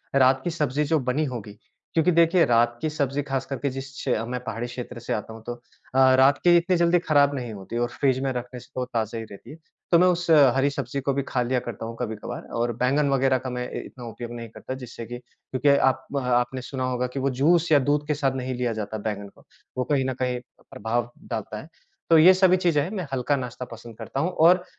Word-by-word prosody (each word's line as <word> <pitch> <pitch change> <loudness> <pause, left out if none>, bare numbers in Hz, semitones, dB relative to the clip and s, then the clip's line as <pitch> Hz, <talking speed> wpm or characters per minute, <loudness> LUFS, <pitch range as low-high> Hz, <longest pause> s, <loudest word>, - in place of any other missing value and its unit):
रात 130 0 +5
की - - -1
सब्ज़ी 150 -3 0
जो 160 +2 +2
बनी 130 +4 0
होगी 105 -3 -7 0.4
क्योंकि 165 +2 +4
देखिए, 170 +1 +4
रात 120 0 +3
की 155 - 0
सब्जी 140 -2 -1
ख़ास 135 -2 -2
करके 140 0 -3
जिस 135 +1 -6
क्ष 135 - -9 0.2
मैं 125 +1 -3
पहाड़ी 120 0 -4
क्षेत्र 125 0 -7
से 120 - -3
आता 110 +1 -4
हूँ 110 0 -12
तो 120 - -3 0.4
अ, 130 0 +6
रात 135 +2 +5
की 175 -1 +6
इतनी 180 +2 +2
जल्दी 170 +1 +4
खराब 145 -3 +3
नहीं 120 -4 -5
होती 100 +4 -6
और 120 0 0
फ्रिज 130 -2 +2
में 135 - 0
रखने 125 0 -5
से - - -15
तो 130 -1 -1
ताज़ा 115 -2 -3
ही 115 - -5
रहती 105 +2 -13
है। - - -9 0.4
तो 170 - +6
मैं 180 - +5
उस 175 -1 0
अ, 140 -5 +7
हरी 135 +1 +3
सब्ज़ी 140 -1 -4
को 140 +1 0
भी 140 0 -1
खा 125 - 0
लिया 125 +1 0
करता 115 -2 -6
हूँ 115 +1 -6
कभी-कभार 110 -3 -5 0.2
और 120 0 0
बैंगन 140 +4 +2
वगैरह 135 -1 +3
का - - -2
मैं 125 0 -4
इ - - -5
इतना 125 -2 -11
उपयोग 120 +1 -7
नहीं 115 -1 -7
करता 130 - -7
जिससे 115 -1 -8
कि 120 +2 -6
क्योंकि 130 +3 -3
आप 130 -1 +2 0.2
आपने 125 +1 0
सुना 130 +1 -5
होगा 125 0 -1
कि - - -1
वो 135 +1 +1
जूस 170 +2 +4
या 145 - +7
दूध 145 +2 +1
के 150 - +1
साथ 135 -2 0
नहीं 130 0 -3
लिया 120 -2 -1
जाता 110 0 -4
बैंगन 105 -1 -4
को, - - -23 0.3
वो 130 - +1
कहीं 135 -2 +2
न 130 - -1
कहीं 125 -1 0 0.3
प्रभाव 120 +2 -2 0.2
डालता 110 0 -4
है। 155 - -14 0.4
तो 165 - +7
ये 175 +4 +8
सभी 185 0 +4
चीजें 170 -5 +2
हैं, 160 - -4
मैं 185 -8 -4
हल्का 135 +2 +1
नाश्ता 125 -1 -5
पसंद 115 -1 -11
करता 135 - -5
हूँ 170 +5 +1
और 175 +2 +5
130 Hz, 245 wpm, -25 LUFS, 120-145 Hz, 0.4 s, ये